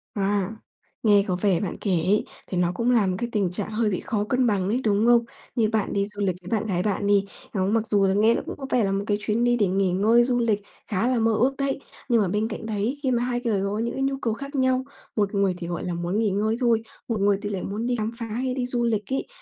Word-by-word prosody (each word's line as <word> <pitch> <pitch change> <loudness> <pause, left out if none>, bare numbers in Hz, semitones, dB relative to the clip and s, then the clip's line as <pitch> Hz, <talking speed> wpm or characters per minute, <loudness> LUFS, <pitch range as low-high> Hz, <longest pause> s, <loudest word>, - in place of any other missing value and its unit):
À, 200 +1 0 0.5
nghe 205 -2 +5
có 185 - 0
vẻ 185 -2 +2
bạn 195 - -3
kể 200 - 0
ấy 185 +4 +2 0.2
thì 185 - -3
nó 175 0 +2
cũng 235 +4 +1
là 220 -6 +3
một 185 - 0
cái 240 0 -2
tình 195 -5 0
trạng 205 +3 -3
hơi 215 0 +1
bị 185 - -1
khó 210 -3 -1
cân 250 +3 +1
bằng 195 -4 +1
ấy, 245 +5 0
đúng 210 0 +2
không? 235 -1 +5 0.3
Như 225 -4 +2
bạn 220 -2 0
đi 200 0 +1
du 205 -1 -7
lịch 185 -3 +1
với 180 - -10
bạn 220 - -5
gái 180 -2 0
bạn 205 -1 0
đi, 200 -1 +4 0.3
đó, 190 -2 +1
mặc 220 +2 +1
dù 205 -2 +2 0.2
nghe 220 +3 +4
là - - -1
cũng - - -5
có 270 - -6
vẻ 245 -4 +2
là 195 - +1
một 195 +1 0
cái 205 -1 +2
chuyến 220 +3 0
đi 240 0 +3
để 205 -4 +3
nghỉ 190 0 +1
ngơi, 220 +6 +4
du 245 0 +1
lịch 220 -3 +1 0.3
khá 215 +3 0
là 255 -2 +2
mơ 225 0 +3
ước 255 +5 +2
đấy, 275 -1 -1 0.3
nhưng 230 -2 +4
mà 195 - +1
bên 210 +4 0
cạnh 225 0 -6
đấy, 220 +5 -1
khi 260 - +1
mà 240 -1 +1
hai 245 -1 -1
người 215 -5 +1
có 205 +2 -1
những 235 +1 -1
cái 270 - -2
nhu 270 0 0
cầu 225 - 0
khác 275 +5 -7
nhau, 260 -1 +2 0.3
một 205 -1 0
người 200 -2 +2
thì, 170 -2 -6
gọi 175 -1 -4
là, 175 - -2
muốn 175 +4 -1
nghỉ 220 -2 +2
ngơi 215 +3 0
thôi, 235 -3 +3 0.3
một 230 -3 -1
người 200 0 +3
thì 205 - -3
lại 190 -3 -3
muốn 215 +4 -3
đi 245 - +1
khám 220 0 -2
phá 235 - -4
hay 250 +4 -2
đi 255 -1 -1
du 245 -1 0
lịch 215 +1 -1
ấy, 270 - -1
215 Hz, 290 wpm, -25 LUFS, 200-235 Hz, 0.5 s, nghe